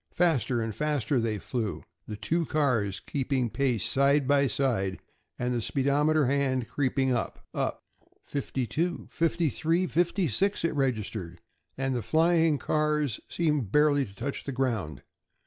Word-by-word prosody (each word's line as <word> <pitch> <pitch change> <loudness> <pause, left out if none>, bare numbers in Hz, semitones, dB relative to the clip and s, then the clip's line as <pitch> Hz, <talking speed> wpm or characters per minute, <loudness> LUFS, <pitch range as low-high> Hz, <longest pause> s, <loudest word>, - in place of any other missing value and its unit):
Faster 135 -8 +2
and 110 -1 -3
faster 145 -3 0
they 115 -2 -1
flew, 105 -7 -3 0.2
the 105 - -5
two 160 +11 -1
cars 115 -11 +1
keeping 130 -4 -1
pace 130 -7 +1
side 140 0 +3
by 140 0 +4
side, 115 -9 0 0.4
and 125 0 -1
the 120 - -1
speedometer 145 +5 +2
hand 130 -2 +1
creeping 135 -1 0
up 120 -2 -2
up. - - -2 0.4
Fifty 135 -2 -3
two, 165 +10 -2
fifty 165 0 +1
three, 165 +6 +1
fifty 175 +1 +1
six! 180 - 0
it 165 - 0
registered, 110 - -2 0.4
and 135 -1 -1
the 120 - -1
flying 160 - +3
cars 150 -3 0
seemed 150 - 0
barely 150 -1 +4
to 100 -5 -9
touch 135 +7 -4
the 140 - -4
ground. 115 - -2
135 Hz, 145 wpm, -28 LUFS, 115-150 Hz, 0.4 s, by